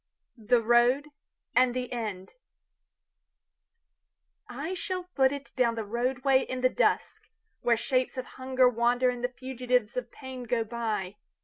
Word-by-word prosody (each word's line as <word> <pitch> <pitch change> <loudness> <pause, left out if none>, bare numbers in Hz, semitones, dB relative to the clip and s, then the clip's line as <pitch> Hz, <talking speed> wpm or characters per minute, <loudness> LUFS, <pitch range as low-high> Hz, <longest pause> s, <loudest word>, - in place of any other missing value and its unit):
The 235 0 +2
Road 240 +5 +4 0.5
and 250 0 +4
the 250 -1 -3
End 210 -6 -4 2.2
I 285 +9 -4
SHALL 370 0 -3
foot 270 -7 +2
itDown 260 -4 -1
the 225 - -3
roadway 255 +5 +1
in 255 -1 -4
the 255 - +4
dusk, - - 0 0.3
Where 235 -1 +3
shapes 255 +2 0
of 255 - -3
hunger 260 0 +2
wanderAnd 245 +1 +2
the 245 - 0
fugitives 250 -2 -1
of 250 -1 -4
pain 260 -2 -8
go 235 -1 0
by. 215 -4 -3
250 Hz, 130 wpm, -28 LUFS, 235-260 Hz, 2.2 s, Road